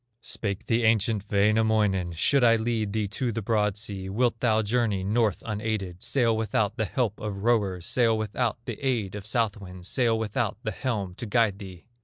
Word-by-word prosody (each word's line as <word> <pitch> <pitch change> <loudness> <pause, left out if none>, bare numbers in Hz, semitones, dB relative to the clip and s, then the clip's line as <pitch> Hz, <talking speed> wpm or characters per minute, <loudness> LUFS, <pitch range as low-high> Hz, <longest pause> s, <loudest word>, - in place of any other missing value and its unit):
Spake 100 -1 -3
the 115 +1 +1
ancient 110 -2 +2
Wainamoinen: 105 -3 +2
"Should 130 - +2
I 115 -1 +6
lead 110 -2 -1
thee 105 -1 -1
to 120 +4 -2
the 115 0 -4
broad 105 -1 +1
sea, 100 -3 -4
Wilt 115 +3 +1
thou 110 -2 +2
journey 105 -3 0
north 105 0 +1
unaided, 105 -4 -3
Sail 120 -4 +2
without 110 -1 0
the 110 - -1
help 110 -1 -1
of 100 -2 -5
rowers, 100 -7 +1
Sail 115 0 +2
without 110 +1 -1
the 120 +1 -6
aid 115 -8 0
of 105 0 -7
south 115 -3 0
winds, 90 -2 -10
Sail 115 -2 +2
without 110 -3 -1
the 110 - -2
helm 105 -5 -3
to 120 +5 -6
guide 105 -2 +2
thee?" 95 -4 -10
110 Hz, 185 wpm, -26 LUFS, 100-115 Hz, -, I